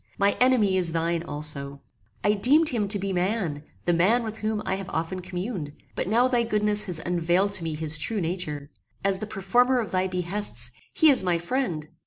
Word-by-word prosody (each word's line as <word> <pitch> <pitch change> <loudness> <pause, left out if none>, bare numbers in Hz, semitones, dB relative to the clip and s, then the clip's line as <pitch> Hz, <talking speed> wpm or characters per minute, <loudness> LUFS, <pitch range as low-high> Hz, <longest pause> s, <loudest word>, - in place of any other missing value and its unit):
My 200 0 +2
enemy 230 -7 +4
is 175 -3 +2
thine 165 0 0
also. 145 -3 -5 0.4
I 205 - +3
deemed 285 +10 +4
him 220 -5 -1
to 205 +1 +5
be 195 0 -3
man, 180 -5 -1 0.2
the 175 - +2
man 205 +9 +3
with 220 -1 -6
whom 215 -1 -2
I 190 - -1
have 195 0 -5
often 165 +4 -3
communed; 180 -4 -5 0.2
but - - -3
now 235 +5 +3
thy 245 -2 +2
goodness 210 -2 +1
has 180 -4 -3
unveiled 175 +3 +1
to 180 - +1
me 160 -1 -3
his 155 0 +1
true 215 +7 -1
nature. 160 -5 -3 0.3
As 195 -1 +3
the 215 - -5
performer 240 +6 +2
of 215 -7 -4
thy 185 0 +1
behests, 180 - -1 0.2
he 315 -2 +5
is 265 - +4
my 175 -2 +1
friend." 170 - -2
190 Hz, 200 wpm, -25 LUFS, 170-215 Hz, 0.4 s, to